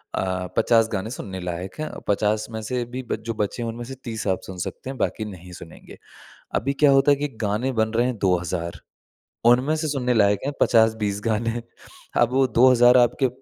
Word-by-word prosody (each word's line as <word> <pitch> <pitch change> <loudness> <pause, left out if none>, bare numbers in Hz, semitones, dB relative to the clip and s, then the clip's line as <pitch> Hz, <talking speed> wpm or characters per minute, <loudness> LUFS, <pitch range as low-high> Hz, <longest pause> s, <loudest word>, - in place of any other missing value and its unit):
अ, 95 -1 -2
50 115 -1 +4
गाने 100 +2 -2
सुनने 95 -7 -6
लायक 90 +1 -5
हैं, 155 - -3 0.2
50 105 +1 +1
में 110 0 -5
से 120 +3 -2
भी 125 +2 -6
बच - - -1
जो 115 - -2
बचे 105 +2 -3
हैं, - - -3
उनमें 115 +1 -6
से 135 +2 -8
30 110 -3 -4
आप 95 -1 +1
सुन 95 - -8
सकते 130 - -5
हैं, 135 - -6
बाकी 110 - -2
नहीं 90 -3 -10
सुनेंगे। 80 - -13 0.6
अभी 140 +4 0
क्या 145 - +7
होता 135 +1 +5
है 140 - +4
कि 145 +1 -2 0.2
गाने 105 +6 0
बन 110 - +1
रहे 120 +2 +2
हैं, 125 -2 -3
2000। 90 -2 -1 0.7
उनमें 125 +6 +4
से 155 0 -2
सुनने 125 -4 0
लायक 100 -2 +3
हैं, 145 - -1
50-20 110 -3 +2
गाने। 115 +1 -1 0.6
अब 120 0 +3
वो 135 0 +3
2000 125 0 +6
आपके 125 +2 +3
115 Hz, 200 wpm, -23 LUFS, 100-125 Hz, 0.7 s, क्या